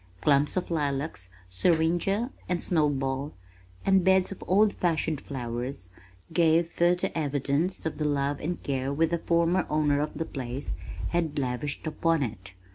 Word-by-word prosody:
Clumps 145 +3 +3
of 180 - -2
lilacs, 140 - -1 0.2
syringa 170 - +1 0.2
and 180 -1 +1
snow 155 -5 +2
ball, 135 +1 -2 0.5
and 195 -1 +4
beds 190 +1 +4
of 195 - -7
old 205 +3 +4
fashioned 160 -4 0
flowers 120 -5 -5 0.4
gave 165 0 +4
further 175 +2 +2
evidence 145 +3 -1
of 160 - -3
the 150 - 0
love 145 -1 0
and 175 +3 -4
care 135 -1 -1
which 160 +3 +1
the 170 - +1
former 170 +2 +2
owners 150 -1 +2
of 150 - -5
the 165 - -2
place 130 -1 -4 0.4
had 170 -4 -1
lavished 135 +3 -2
upon 165 -1 +1
it. 95 -5 -6
155 Hz, 150 wpm, -28 LUFS, 140-170 Hz, 0.5 s, and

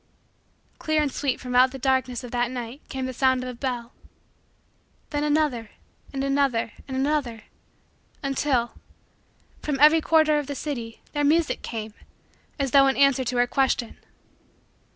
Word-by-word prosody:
Clear 310 0 +1
and 295 -2 +1
sweet 275 -2 -1
from 250 -1 -6
out 255 +1 +6
the 270 - -8
darkness 260 -2 0
of 245 - -8
the 245 0 +1
night 245 +2 -6
came 265 -1 -3
the 260 - -4
sound 260 0 +2
of 255 - -5
a - - -5
bell. 245 -1 -4 1.2
Then 290 -1 -1
another, 295 -7 0 0.4
and 270 -1 -3
another, 275 -5 +1 0.2
and 265 -1 -4
another, 265 -5 -1 0.8
until, 270 -3 0 0.9
from 290 -3 -2
every 305 +3 +7
quarter 310 -2 +3
of 290 - -5
the 285 - -4
city, 240 -6 -5
their 290 -1 -1
music 315 +2 +2
came, 220 -2 -6 0.6
as 275 -3 -1
though 275 -1 +6
in 270 - +1
answer 275 -1 +4
to 245 0 -2
her 245 - +4
question. 250 -2 0
265 Hz, 155 wpm, -25 LUFS, 245-290 Hz, 1.2 s, every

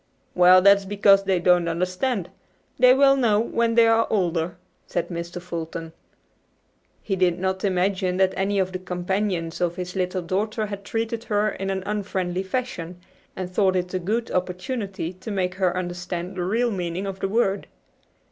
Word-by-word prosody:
"Well, 180 +1 +6
that 200 0 +8
is 200 - -8
because 195 -1 +4
they 190 -2 +2
don't 175 -1 +3
understand. 185 +5 -1 0.5
They 250 - +7
will 275 0 +5
know 230 -6 +3
when 230 0 0
they 230 -1 +6
are 225 0 +3
older," 175 -4 0 0.3
said 175 -1 -2
Mr. 170 0 -5
Fulton. 165 -1 -6 1.1
He 195 - -1
did 180 -2 +2
not 190 +1 -2
imagine 185 -1 0
that 190 0 +3
any 195 +1 0
of 190 -1 +1
the 185 - -4
companions 180 -1 -2
of 175 -1 0
his 180 0 -6
little 185 -1 -1
daughter 215 +5 -1
had 200 -1 -6
treated 225 +2 -3
her 210 -1 +1
in 195 -1 -4
an 190 -1 -2
unfriendly 190 -3 -2
fashion, 190 -5 -4 0.4
and 185 -1 -5
thought 190 -1 +2
it 180 0 -2
a 185 - 0
good 220 +6 -2
opportunity 185 0 -3
to 185 +4 -10
make 185 -3 -1
her 185 -1 0
understand 180 0 -4
the 180 -1 -2
real 230 +5 +1
meaning 180 -1 -3
of 195 -1 -5
the 195 - -1
word. 200 -2 0
190 Hz, 175 wpm, -24 LUFS, 180-205 Hz, 1.1 s, that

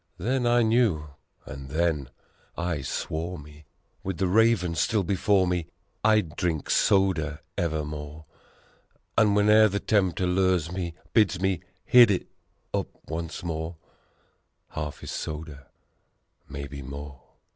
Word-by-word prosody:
Then 120 +6 0
I 120 0 +4
knew, 110 -10 +2 0.4
and 65 0 -8
then 75 -3 0 0.5
I 85 -4 -1
swore 80 +6 -3
me, 75 +1 -13 0.4
With 95 -3 -3
the 95 - +1
Raven 100 -2 +3
still 100 +5 +1
before 95 +1 +2
me, 90 -2 -1 0.4
I'd 105 -8 +3
drink 80 -5 -1
soda 85 -6 +2
evermore! 75 -2 -3 0.9
And 105 -2 +4
whene'er 105 +1 +6
the 100 +1 -1
Tempter 95 -5 +1
lures 90 -2 +2
me, 90 -2 -4 0.2
bids 100 -5 +3
me 95 -2 0 0.2
hit 120 -3 +8
it 95 - 0 0.5
up - - 0 0.2
once 80 +2 -5
more, 80 0 -4 0.9
Half 75 -2 -5
is - - -6
soda 75 -2 -6 0.8
maybe 70 0 -7
more. 70 0 -8
85 Hz, 125 wpm, -26 LUFS, 75-100 Hz, 0.9 s, hit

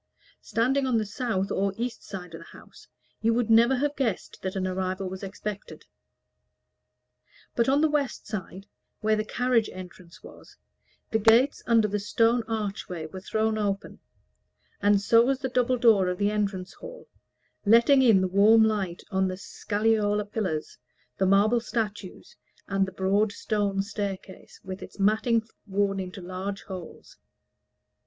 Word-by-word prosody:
Standing 255 +5 0
on 245 -3 +2
the 215 - 0
south 205 -2 -2
or 195 0 0
east 240 +1 -4
side 180 -3 -8
of 165 - -7
the 165 - -13
house, - - -17 0.3
you 225 +1 +2
would 235 -2 0
never 235 +4 +6
have 290 +3 -1
guessed 230 -9 -2
that 190 0 -4
an 190 -1 -1
arrival 185 0 -2
was 185 0 -7
expected. 205 +1 -7 1.7
But 235 +1 +2
on 280 +2 +3
the 315 - +4
west 295 -3 -2
side, 195 -2 -6 0.4
where 215 0 +2
the 215 - -1
carriage 240 0 +1
entrance 180 -1 -12
was, - - -15 0.5
the 220 - +2
gates 230 +6 +4
under 230 -2 +4
the 210 0 -2
stone 230 +3 +2
archway 200 -6 -4
were 185 +4 -8
thrown 220 +2 -1
open; 200 -1 -3 0.8
and 205 0 +4
so 230 +3 +5
was 265 +2 +1
the 260 0 -3
double 250 0 +1
door 220 -6 +4
of 180 0 -1
the 205 +1 +1
entrance 195 -3 -2
hall, - - -11 0.6
letting 235 +6 +5
in 225 -7 +5
the 185 - +1
warm 210 +4 +5
light 200 -5 -1
on 190 -1 +1
the 185 0 -4
scagliola 210 +1 0
pillars, 195 -8 -4 0.4
the 190 - +3
marble 205 +5 +4
statues, 215 -4 -5 0.3
and 195 -1 +1
the - - -6
broad 200 +3 +1
stone 205 -3 -1
staircase, 200 -2 -6
with 190 0 -7
its - - -11
matting 220 +3 +2 0.2
worn 195 0 0
into 185 0 -6
large 185 +3 -5
holes. 185 -4 -10
210 Hz, 155 wpm, -26 LUFS, 190-230 Hz, 1.7 s, never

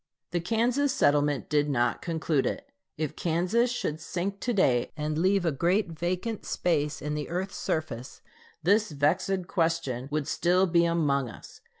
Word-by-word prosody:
The 175 - 0
Kansas 240 +9 +1
settlement 145 - +2
did 150 -1 +1
not 120 -4 +1
conclude 160 -4 0
it. 280 +1 -4 0.3
If 155 -1 -3
Kansas 180 +9 +1
should 160 -10 -2
sink 185 +5 -3
to 245 - -1
day, 130 - +2
and 150 0 -2
leave 185 +3 +2
a 165 - +2
great 175 +6 +1
vacant 180 +7 -3
space 150 -4 -1
in 150 0 -2
the 150 -1 -3
earth's 185 +3 -3
surface, 135 -5 -3 0.4
this 205 +5 +3
vexed 175 +6 0
question 165 -8 -1
would 150 -1 -2
still 180 +2 +3
be 170 -1 +3
among 145 -6 +1
us. 110 - -13
170 Hz, 160 wpm, -28 LUFS, 150-190 Hz, 0.4 s, this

